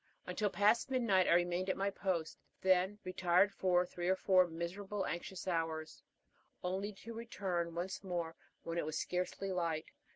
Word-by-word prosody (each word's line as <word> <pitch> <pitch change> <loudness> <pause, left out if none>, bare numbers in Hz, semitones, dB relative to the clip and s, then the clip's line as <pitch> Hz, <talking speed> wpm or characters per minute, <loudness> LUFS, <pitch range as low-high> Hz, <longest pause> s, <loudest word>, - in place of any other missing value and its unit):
Until 210 -1 0
past 205 +7 +3
midnight 230 -8 +3
I - - +5
remained 175 +2 +2
at - - 0
my 200 +1 +1
post, 180 -5 -2 0.2
then 190 +2 +3
retired 185 +1 +3
for 180 -1 +3
three 175 0 -3
or 190 - +4
four 185 -1 +4
miserable, 190 +4 -3
anxious 175 +2 -5
hours, 160 -2 -2 0.6
only 190 +3 -1
to 230 +4 -9
return 190 -7 -2
once 180 +4 -3
more 170 -3 -3 0.3
when 170 0 -2
it - - -1
was 155 0 -2
scarcely 180 +2 -2
light. 165 -3 -1
185 Hz, 160 wpm, -36 LUFS, 170-195 Hz, 0.6 s, I